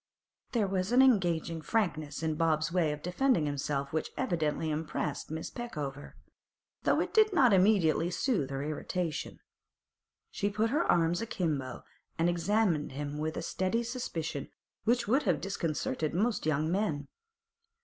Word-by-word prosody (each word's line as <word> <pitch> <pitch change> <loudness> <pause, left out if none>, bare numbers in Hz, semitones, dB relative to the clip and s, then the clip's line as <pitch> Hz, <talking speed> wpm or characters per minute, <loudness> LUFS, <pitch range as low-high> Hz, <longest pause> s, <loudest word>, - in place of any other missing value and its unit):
There 230 -4 +2
was 190 +1 -1
an 255 +2 +6
engaging 170 -9 +2
frankness 155 -7 -1
in 160 -1 +1
Bob's 155 0 +1
way 170 -4 +2
of 150 0 -6
defending 180 - +2
himself 140 0 -2
which 160 - -1
evidently 160 -1 0
impressed 150 -1 -3
Miss 160 +1 -5
Peckover, 145 - -6 0.7
though - - +2
it - - -3
did 430 -1 +5
not 255 - +5
immediately 185 -4 +4
soothe 180 - 0
her 135 0 -3
irritation. 155 +2 -3 0.9
She 200 - -1
put 215 +3 0
her 305 +5 +2
arms 170 0 +2
a 230 - -3
kimbo, 150 - -2 0.3
and 165 - +2
examined 175 -4 +1
him 145 +1 -4
with 155 +1 -2
a - - -3
steady 190 +6 0
suspicion 170 - -4 0.4
which 235 0 +2
would 265 +7 +3
have 180 - +1
disconcerted 160 -5 -2
most 210 -2 0
young 155 +1 +1
men. 165 -8 -1
170 Hz, 150 wpm, -31 LUFS, 150-210 Hz, 0.9 s, an